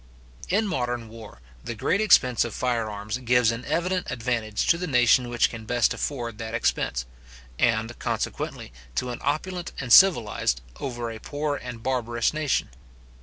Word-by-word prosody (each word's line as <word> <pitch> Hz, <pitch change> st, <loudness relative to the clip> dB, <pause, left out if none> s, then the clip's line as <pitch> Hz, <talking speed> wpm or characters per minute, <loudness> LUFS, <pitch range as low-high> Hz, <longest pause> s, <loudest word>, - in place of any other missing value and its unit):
In 210 Hz, +4 st, +2 dB
modern 120 Hz, -, -2 dB
war, 110 Hz, -, -12 dB, 0.2 s
the 115 Hz, -, -5 dB
great 185 Hz, -, +1 dB
expense 130 Hz, -, +5 dB
of 120 Hz, -, -5 dB
firearms 110 Hz, -2 st, -2 dB
gives 125 Hz, -2 st, +3 dB
an 115 Hz, +2 st, -5 dB
evident 180 Hz, +2 st, -1 dB
advantage 115 Hz, -3 st, -1 dB
to 170 Hz, -, +3 dB
the 180 Hz, -, -3 dB
nation 125 Hz, -2 st, +4 dB
which 120 Hz, -1 st, +2 dB
can 115 Hz, -1 st, -8 dB
best 120 Hz, +1 st, +2 dB
afford 120 Hz, -6 st, -4 dB
that 115 Hz, 0 st, -4 dB
expense; 65 Hz, -, 0 dB, 0.5 s
and, 115 Hz, 0 st, +1 dB
consequently, -, -, -3 dB, 0.2 s
to 125 Hz, -, -1 dB
an 120 Hz, -, -6 dB
opulent 170 Hz, +5 st, -2 dB
and 125 Hz, -3 st, +1 dB
civilized, 115 Hz, -, +5 dB, 0.2 s
over 120 Hz, -3 st, -4 dB
a 110 Hz, -, -8 dB
poor 145 Hz, +3 st, -2 dB
and 120 Hz, -4 st, -8 dB
barbarous 120 Hz, -2 st, 0 dB
nation. 155 Hz, -, 0 dB
120 Hz, 155 wpm, -25 LUFS, 115-140 Hz, 0.5 s, expense